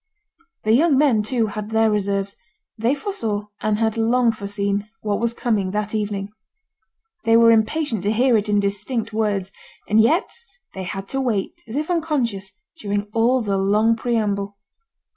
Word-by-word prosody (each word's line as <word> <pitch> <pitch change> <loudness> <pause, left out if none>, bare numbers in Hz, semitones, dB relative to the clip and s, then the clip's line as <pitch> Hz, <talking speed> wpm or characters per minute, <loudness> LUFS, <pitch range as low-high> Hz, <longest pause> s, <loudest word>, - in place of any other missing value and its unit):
The 215 - +1
young 290 +3 +4
men, 265 -7 +4
too, 230 +2 0
had 210 0 -5
their 225 0 +3
reserves. 200 -1 -1 0.4
They 230 +5 +1
foresaw, 225 - -3
and 215 -1 +1
had 220 0 0
long 235 +1 +3
foreseen, 200 -1 -3
what 205 -2 -1
was 235 0 -1
coming 210 -7 0
that 210 0 -2
evening. 205 -2 -2 0.9
They 225 0 +5
were 230 0 +6
impatient 225 - +1
to 205 +3 +1
hear 245 +2 +3
it 210 -1 +1
in 205 0 +3
distinct 210 +3 -1
words; 205 -3 -1 0.4
and 215 +1 +4
yet 320 - +2 0.4
they 190 -1 -6
had 195 +2 -5
to 270 - -1
wait, 220 -7 -2
as 225 - -7
if 305 +4 -1
unconscious, 255 - -1 0.3
during 205 0 -2
all 235 +2 +2
the 200 -2 0
long 210 +4 +3
preamble. 205 -4 -1
215 Hz, 160 wpm, -21 LUFS, 205-235 Hz, 0.9 s, were